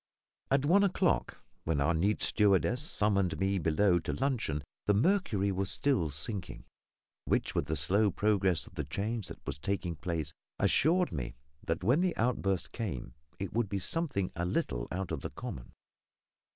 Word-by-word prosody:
At 135 +1 +2
one 195 +7 +5
o'clock, 185 -2 +1 0.2
when 80 -3 0
our 75 +5 +2
neat 95 +6 +1
stewardess 105 +4 +3
summoned 100 - +1
me 95 0 +1
below 85 +3 +3
to - - -3
luncheon, 120 - -1 0.2
the 105 - +4
mercury 110 - +2
was 95 0 +1
still 130 - +2
sinking, 80 +7 -4 0.6
which, - - 0
with 70 - -1
the 80 - 0
slow 100 +8 +3
progress 95 -6 +1
of - - -15
the 75 - -3
change 100 - -3
that - - -11
was - - -4
taking 90 0 -2
place, 80 -2 -3 0.2
assured 175 +3 +3
me - - -4 0.3
that 80 +2 -2
when 125 - +3
the 180 -2 0
outburst 100 -6 0
came, 70 - -4 0.2
it 95 -2 -5
would 115 -3 0
be 100 - -1
something 100 - -2
a 85 - -2
little - - -1
out 95 -1 -3
of 80 -4 -3
the - - -4
common. 60 - -7
95 Hz, 165 wpm, -31 LUFS, 80-115 Hz, 0.6 s, one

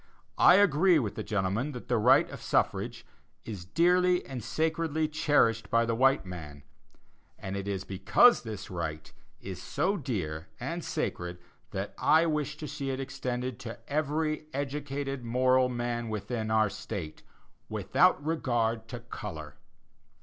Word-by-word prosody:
I 180 - +8
agree 185 -2 +5
with 115 -9 -1
the - - -5
gentleman 105 +8 -1
that 125 - -8
the - - +2
right - - +5
of - - -8
suffrage - - 0 0.4
is 100 -6 -6
"dearly 180 - +3
and 125 -4 -6
sacredly 160 +1 0
cherished 145 -7 +2
by 115 0 +3
the 115 - 0
white 135 0 +3
man"; 75 -6 -8 0.7
and 95 +1 -5
it 100 0 -4
is 95 -2 -2
because 100 - +4
this 110 -5 -7
right 80 -3 -5 0.3
is 95 -2 -7
so 200 +3 0
dear 90 - -3
and - - -4
sacred, 90 0 -3 0.3
that - - -4
I 160 +2 +5
wish 150 -2 -1
to 150 - -6
see 140 -1 -4
it 130 0 -2
extended 130 -2 -4
to 115 -3 -7
every 155 +1 -1
educated 140 -1 -3
moral 130 +2 +3
man 120 -1 -2
within 110 +1 -3
our 110 -2 +3
State, 100 -6 -6 0.5
without 145 - +2
regard 120 -8 0
to 120 0 -7
color. 85 - -7
125 Hz, 145 wpm, -29 LUFS, 100-150 Hz, 0.7 s, I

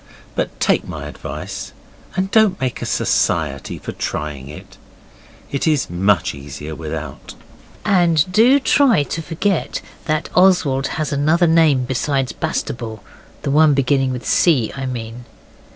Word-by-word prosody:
But - - -3
take - - +1
my - - -6
advice - - -7 0.4
and 190 +1 -1
don't 215 -4 +4
make 130 -2 -2
a - - -3
society - - 0
for - - -7
trying 70 -3 -4
in. 75 - -10 0.9
It 140 +3 -1
is 150 - +1
much 90 0 +2
easier 70 +2 -8
without. 80 -2 -7 0.5
And 175 -6 +3
do 240 +8 +5
try 260 - +4
to 165 - -4
forget 165 +3 -1 0.3
that 155 -1 -1
Oswald 170 -8 +3
has 155 -1 -2
another 155 +5 +3
name 160 -6 +4
besides 135 0 -1
Bastable. 110 -4 -4 0.4
The 140 - -1
one 150 0 +5
beginning 135 0 +2
with 125 -1 -5
C., 140 -11 +3
I 135 -1 -4
mean. 120 -1 -6
140 Hz, 135 wpm, -19 LUFS, 115-165 Hz, 0.9 s, do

